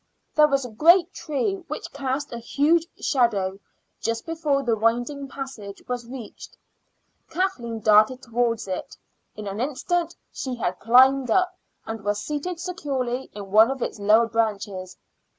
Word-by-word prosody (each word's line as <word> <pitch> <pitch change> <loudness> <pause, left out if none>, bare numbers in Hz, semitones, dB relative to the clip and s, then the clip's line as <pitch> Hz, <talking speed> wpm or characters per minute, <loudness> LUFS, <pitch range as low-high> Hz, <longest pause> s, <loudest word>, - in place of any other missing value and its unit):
There 300 -1 +6
was 275 -2 0
a 245 - -8
great 340 - +5
tree, 305 +7 -2
which 305 - -6
cast 275 0 -3
a 235 - -4
huge 305 +8 +2
shadow, 200 -8 +1 0.4
just 230 0 -2
before 305 -4 0
the 235 -3 +2
winding 240 +6 0
passage 260 -8 -8
was 245 -1 -4
reached. 245 -3 -10 0.7
Kathleen 250 - -2
darted 215 +4 +4
towards 235 -2 -1
it. 185 -1 -5 0.4
In 210 - -7
an 200 +2 -4
instant 330 +6 -1 0.2
she 260 -2 -4
had 185 -6 -2
climbed 255 +3 +5
up 365 +9 +2 0.3
and 225 -2 -6
was 205 0 0
seated 305 +6 -4
securely 270 -8 -3
in 200 -2 -8
one 220 +3 +7
of 270 -2 -2
its - - -4
lower 215 +3 +5
branches. 205 -5 -2
245 Hz, 150 wpm, -24 LUFS, 220-290 Hz, 0.7 s, one